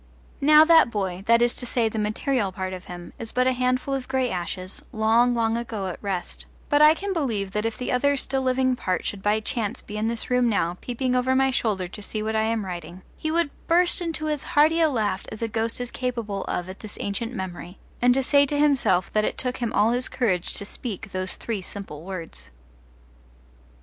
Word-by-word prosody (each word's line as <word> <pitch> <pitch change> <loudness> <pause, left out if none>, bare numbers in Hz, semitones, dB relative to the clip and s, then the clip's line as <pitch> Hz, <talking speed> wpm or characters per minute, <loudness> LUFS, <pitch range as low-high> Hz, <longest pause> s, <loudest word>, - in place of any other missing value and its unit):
Now 305 +2 +7
that 325 -5 +6
boy 190 -4 -3
that 230 +1 +5
is 240 - +2
to - - -6
say, 230 -1 +2
the 220 0 -3
material 215 0 0
part 185 0 -4
of 185 -1 -8
him 175 -1 -9
is 225 -1 -4
but 255 0 +2
a 260 - +4
handful 255 +2 0
of 265 -2 -3
grey 260 -2 0
ashes, 185 +1 -4
long, 230 +3 +3
long 225 -1 +1
ago 225 -4 -3
at 180 - -7
rest; 195 -3 -4 0.2
but 290 0 +4
I 305 +1 +8
can 395 +3 -3
believe 225 - -1
that 210 +3 -1
if 225 - -5
the 250 - -3
other 285 +3 +2
still 270 0 0
living 260 0 +2
part 185 -7 -2
should 200 - -3
by 210 +2 +2
chance 220 +1 -2
be 210 - -7
in 215 +1 0
this 230 +2 -3
room 250 -1 +3
now, 175 -5 0
peeping 250 +1 -1
over 255 +1 +2
my 265 0 +3
shoulder 205 -7 0
to 210 - -9
see 215 +1 -4
what 220 +1 -2
I 220 - +3
am 225 -2 -1
writing, 175 0 -7
he 315 - -3
would 330 -2 +1 0.2
burst 350 +1 +3
into 325 -2 -2
as 300 -2 -1 0.2
hearty 315 +3 +5
a 320 - +5
laugh 220 -7 -1
as 220 +1 -5
a - - +1
ghost 225 +1 -1
is 245 -1 -3
capable 235 -6 -3
of 180 - -3
at 185 +1 -9
this 215 -2 -8
ancient 225 +4 -3
memory, 185 -2 -6 0.2
and 250 +2 +4
say 285 0 +4
to 290 - -1
himself 270 -11 +2
that 215 - +2
it - - -1
took 250 0 -2
him 235 -2 -2
all 215 +3 +3
his 250 +1 -1
courage 215 -9 0
to 200 - +2
speak 210 -1 -5
those 185 0 -3
three 220 -4 -3
simple 185 -5 -8
words. 165 - -7
230 Hz, 220 wpm, -24 LUFS, 200-260 Hz, 0.2 s, I